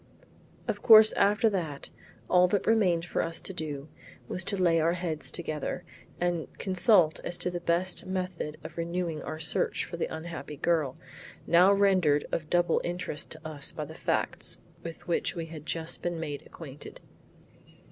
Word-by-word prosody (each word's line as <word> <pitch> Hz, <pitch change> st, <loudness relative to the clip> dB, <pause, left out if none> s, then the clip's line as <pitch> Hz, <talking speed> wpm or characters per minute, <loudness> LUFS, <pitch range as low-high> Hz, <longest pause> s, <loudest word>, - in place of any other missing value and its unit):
Of 205 Hz, -3 st, -2 dB
course 220 Hz, -1 st, +9 dB
after 205 Hz, +3 st, +3 dB
that, 160 Hz, -8 st, -4 dB, 0.4 s
all 180 Hz, 0 st, +5 dB
that 200 Hz, +2 st, 0 dB
remained 185 Hz, -7 st, +3 dB
for -, -, -1 dB
us 165 Hz, 0 st, -1 dB
to 190 Hz, -, -3 dB
do 150 Hz, -4 st, -5 dB, 0.4 s
was 185 Hz, -, -3 dB
to 200 Hz, -, -2 dB
lay 170 Hz, -3 st, +3 dB
our 165 Hz, +2 st, +2 dB
heads 170 Hz, -3 st, 0 dB
together 160 Hz, +1 st, -3 dB, 0.4 s
and 175 Hz, -2 st, -1 dB
consult 185 Hz, -3 st, +3 dB
as 175 Hz, -, -3 dB
to 180 Hz, -, -2 dB
the 175 Hz, -, -3 dB
best 175 Hz, +2 st, 0 dB
method 180 Hz, -5 st, -3 dB
of 160 Hz, +2 st, -8 dB
renewing 170 Hz, -2 st, -2 dB
our 155 Hz, -, -6 dB
search 160 Hz, -, +2 dB
after 170 Hz, -, -7 dB
the -, -, -1 dB
unhappy 160 Hz, -2 st, -7 dB
girl, 155 Hz, -5 st, 0 dB, 0.5 s
now 180 Hz, +3 st, +6 dB
rendered 185 Hz, -7 st, +3 dB
of 155 Hz, -2 st, -3 dB
double 175 Hz, 0 st, +2 dB
interest 175 Hz, -4 st, -3 dB
to 155 Hz, 0 st, -9 dB
us 145 Hz, -3 st, -1 dB
by -, -, -5 dB
the -, -, -10 dB
facts -, -, -1 dB, 0.2 s
with 165 Hz, -1 st, -9 dB
which 170 Hz, +2 st, 0 dB
we 165 Hz, -1 st, -4 dB
had 160 Hz, -1 st, -10 dB
just 165 Hz, 0 st, -2 dB
been 175 Hz, -1 st, -2 dB
made 145 Hz, -3 st, -5 dB
acquainted. 150 Hz, -3 st, -11 dB
170 Hz, 165 wpm, -29 LUFS, 160-180 Hz, 0.5 s, course